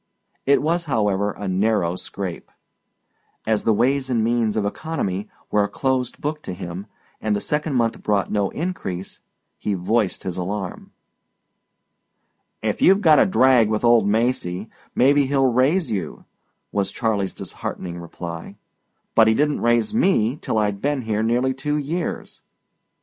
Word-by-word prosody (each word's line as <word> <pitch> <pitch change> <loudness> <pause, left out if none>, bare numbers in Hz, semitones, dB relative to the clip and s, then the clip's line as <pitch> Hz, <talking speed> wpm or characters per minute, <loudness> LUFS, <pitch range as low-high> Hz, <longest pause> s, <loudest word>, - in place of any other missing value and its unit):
It 140 +1 +4
was, 170 +2 0
however, 105 -7 +1
a 100 - -6
narrow 95 -2 +1
scrape; 90 -1 -6 1.0
as 110 -1 0
the 115 - +4
ways 130 +5 +1
and 115 -3 +1
means 115 -2 +1
of 105 - +1
economy 105 - -3 0.2
were 105 -1 +3
a 100 - -2
closed 130 -2 -1
book 150 +1 -3
to 95 - -6
him 90 +2 -7 0.3
and 110 -1 +1
the - - 0
second 150 +4 -1
month 115 -2 0
brought 100 -2 0
no 100 -2 +1
increase, 145 - -4 0.4
he 105 - -1
voiced 100 +3 0
his 90 -1 -4
alarm. 95 +1 -4 1.7
"If - - -1
you've 195 +2 +5
got 160 -5 +6
a - - +5
drag 130 - +4
with 110 +1 -1
old 120 -3 +5
Macy, 110 -3 0 0.2
maybe 140 +2 +4
he'll 135 -1 +2
raise 130 +8 +2
you," 95 -6 -4 0.5
was 100 -1 -1
Charley's 100 -4 -1
disheartening 85 -1 -6
reply. 85 0 -7 0.6
"But 110 -1 +6
he 110 - +4
didn't 150 +2 +1
raise 120 - +2
ME 160 - +2
till - - -1
I'd 105 -2 0
been 145 -2 0
here 110 -1 -1
nearly 120 +4 +1
two 150 +3 -2
years." 160 +5 -4
110 Hz, 150 wpm, -22 LUFS, 100-135 Hz, 1.7 s, got